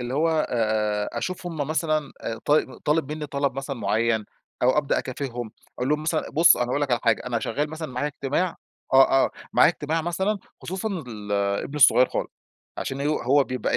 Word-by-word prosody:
اللي 125 Hz, +1 st, -4 dB
هو 160 Hz, +3 st, +2 dB, 0.8 s
أشوف 185 Hz, -1 st, -4 dB
هم 165 Hz, -2 st, -5 dB
مثلًا 155 Hz, +1 st, -1 dB, 0.3 s
طال 150 Hz, +1 st, +1 dB
طالب 150 Hz, -1 st, +1 dB
مني 155 Hz, -1 st, -5 dB
طلب 140 Hz, -1 st, -1 dB
مثلًا 135 Hz, -1 st, -4 dB
معين 110 Hz, -1 st, +1 dB, 0.4 s
أو 130 Hz, +4 st, +4 dB
أبدأ 145 Hz, -2 st, +1 dB
أكافئهم، 125 Hz, -3 st, -5 dB, 0.3 s
أقول 125 Hz, +2 st, -1 dB
لهم 150 Hz, +1 st, +1 dB
مثلًا 155 Hz, 0 st, -1 dB
بُص، 165 Hz, +2 st, +6 dB
أنا 120 Hz, -, 0 dB
هاقول 140 Hz, +4 st, 0 dB
لك 145 Hz, -, -1 dB
على 120 Hz, -, +2 dB
حاجة، 115 Hz, -2 st, +2 dB
أنا 120 Hz, -2 st, 0 dB
شغال 145 Hz, +7 st, -2 dB
مثلًا 160 Hz, 0 st, -5 dB
معايا 125 Hz, +4 st, -1 dB
اجتماع 145 Hz, +5 st, -2 dB, 0.4 s
آه، 135 Hz, 0 st, +6 dB
آه، -, -, -1 dB, 0.2 s
معايا 155 Hz, -, +6 dB
اجتماع 160 Hz, 0 st, -2 dB
مثلًا، 190 Hz, +5 st, -1 dB, 0.2 s
خصوصًا 190 Hz, +4 st, -3 dB, 0.2 s
ال 105 Hz, -3 st, -7 dB
ابني 100 Hz, +8 st, -1 dB
الصغير 130 Hz, -2 st, +6 dB
خالص، -, -, -3 dB, 0.5 s
عشان 135 Hz, +1 st, -3 dB
ه 140 Hz, -, -1 dB, 0.2 s
هو 140 Hz, +3 st, +4 dB
بيبقى 125 Hz, -3 st, -1 dB
140 Hz, 185 wpm, -25 LUFS, 125-155 Hz, 0.8 s, بُص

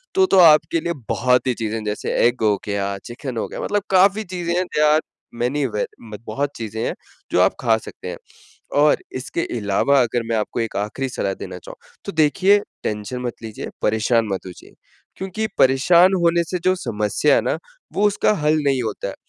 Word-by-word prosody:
तो 380 Hz, 0 st, +5 dB
तो 195 Hz, -, +3 dB
आपके 165 Hz, -1 st, +6 dB
लिए 170 Hz, -, -2 dB, 0.2 s
बहुत 125 Hz, +1 st, +2 dB
ही 125 Hz, -, +2 dB
चीज़ें 110 Hz, -1 st, -3 dB
हैं, 110 Hz, -, -5 dB
जैसे 105 Hz, 0 st, -3 dB
एग 120 Hz, 0 st, -2 dB
हो 105 Hz, -1 st, +4 dB
गया, 100 Hz, -1 st, -2 dB
चिकन 120 Hz, 0 st, -6 dB
हो -, -, -2 dB
गया -, -, -6 dB
मतलब 205 Hz, -1 st, -1 dB
काफ़ी 195 Hz, +3 st, +4 dB
चीज़ें 170 Hz, -1 st, -2 dB
हैं, 180 Hz, -, +2 dB
देयर 150 Hz, -3 st, +1 dB
आर 155 Hz, +1 st, +4 dB, 0.4 s
मैनी 135 Hz, +4 st, 0 dB
वेद 105 Hz, -3 st, -2 dB, 0.3 s
मत 105 Hz, -, -8 dB
बहुत 140 Hz, +6 st, -2 dB
चीज़ें 110 Hz, -1 st, -5 dB
हैं, -, -, -1 dB, 0.4 s
जो -, -, +2 dB
आप 95 Hz, -, +3 dB
खा 115 Hz, -3 st, +3 dB
सकते 110 Hz, -, -9 dB
हैं। -, -, -6 dB, 0.7 s
और 150 Hz, -, +3 dB, 0.2 s
इसके 145 Hz, +5 st, -4 dB, 0.2 s
अलावा 110 Hz, +7 st, +2 dB
अगर 120 Hz, 0 st, -1 dB
मैं 115 Hz, -, +1 dB
आपको 110 Hz, +2 st, -2 dB
एक 115 Hz, -, -3 dB
आख़िरी 105 Hz, +6 st, -2 dB
सलाह 100 Hz, -5 st, -2 dB
देना -, -, -8 dB
चाहूँ, -, -, -11 dB, 0.3 s
तो 200 Hz, -, -5 dB
देखिए, 185 Hz, +6 st, +4 dB, 0.3 s
टेंशन 105 Hz, +4 st, -3 dB
मत 120 Hz, -1 st, -5 dB
लीजिए, 110 Hz, -2 st, -7 dB
परेशान 110 Hz, +2 st, +2 dB
मत 95 Hz, -, -4 dB
होजिए, 90 Hz, -, -12 dB, 0.4 s
क्योंकि 195 Hz, +3 st, -3 dB
परेशान 170 Hz, +8 st, +5 dB
होने 170 Hz, 0 st, +3 dB
से 180 Hz, +2 st, -3 dB
जो 185 Hz, 0 st, +4 dB
समस्या 120 Hz, -, +1 dB
है -, -, +4 dB
ना, -, -, -1 dB, 0.3 s
वो 205 Hz, +1 st, +2 dB
उसका 205 Hz, +1 st, +2 dB
हल 155 Hz, +1 st, +3 dB
नहीं 135 Hz, -3 st, +1 dB
होता 110 Hz, -2 st, -4 dB
है। -, -, -6 dB
130 Hz, 200 wpm, -21 LUFS, 110-170 Hz, 0.7 s, आपके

